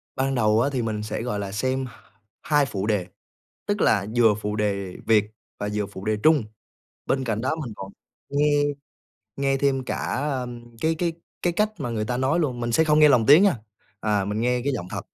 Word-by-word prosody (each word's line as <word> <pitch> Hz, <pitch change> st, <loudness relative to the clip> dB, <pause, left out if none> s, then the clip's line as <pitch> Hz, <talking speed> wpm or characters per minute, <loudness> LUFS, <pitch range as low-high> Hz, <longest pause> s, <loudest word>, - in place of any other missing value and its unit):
Ban 135 Hz, 0 st, 0 dB
đầu 110 Hz, -1 st, +3 dB
á 140 Hz, -, +2 dB
thì 125 Hz, -, 0 dB
mình 110 Hz, -2 st, -2 dB
sẽ, 110 Hz, -, -4 dB
gọi 115 Hz, -4 st, -2 dB
là, 100 Hz, -1 st, -4 dB
xem 130 Hz, +5 st, -1 dB, 0.6 s
2 145 Hz, -2 st, +2 dB
phụ 100 Hz, -4 st, -3 dB
đề, 100 Hz, -5 st, 0 dB, 0.6 s
tức 205 Hz, 0 st, -1 dB
là 100 Hz, -1 st, +3 dB
vừa 115 Hz, -3 st, +5 dB
phụ 105 Hz, 0 st, -4 dB
đề 100 Hz, -3 st, -2 dB
Việt 105 Hz, -2 st, +3 dB, 0.3 s
và 105 Hz, -, -3 dB
vừa 105 Hz, -1 st, -1 dB
phụ 95 Hz, -1 st, -10 dB
đề 110 Hz, 0 st, +1 dB
Trung. 155 Hz, -6 st, +4 dB, 0.6 s
Bên 135 Hz, -1 st, 0 dB
cạnh 110 Hz, -3 st, -1 dB
đó 130 Hz, +6 st, -1 dB
mình 120 Hz, -, -6 dB
còn 95 Hz, 0 st, -8 dB, 0.4 s
nghe 145 Hz, +1 st, +2 dB, 0.7 s
nghe 135 Hz, 0 st, +1 dB
thêm 135 Hz, -1 st, +1 dB
cả, -, -, -3 dB, 0.3 s
ơm, 120 Hz, -3 st, -5 dB
cái 160 Hz, +1 st, +1 dB
cái 170 Hz, +1 st, -1 dB, 0.3 s
cái 175 Hz, -, +1 dB
cách 210 Hz, +4 st, +1 dB
mà 125 Hz, -4 st, -2 dB
người 110 Hz, -2 st, -2 dB
ta 120 Hz, +2 st, -2 dB
nói 130 Hz, +6 st, +1 dB
luôn. 125 Hz, -6 st, -1 dB
Mình 120 Hz, 0 st, -2 dB
sẽ 160 Hz, +7 st, +4 dB
không 150 Hz, 0 st, +3 dB
nghe 150 Hz, -, +7 dB
lồng 120 Hz, -6 st, +4 dB
tiếng 150 Hz, +7 st, +8 dB
nha, 195 Hz, -10 st, +4 dB, 0.4 s
à 105 Hz, -2 st, +1 dB
mình 105 Hz, +2 st, -2 dB
nghe 125 Hz, +1 st, +1 dB
cái 140 Hz, -, +1 dB
giọng 105 Hz, -9 st, -4 dB
thật. -, -, -3 dB
120 Hz, 220 wpm, -24 LUFS, 105-140 Hz, 0.7 s, tiếng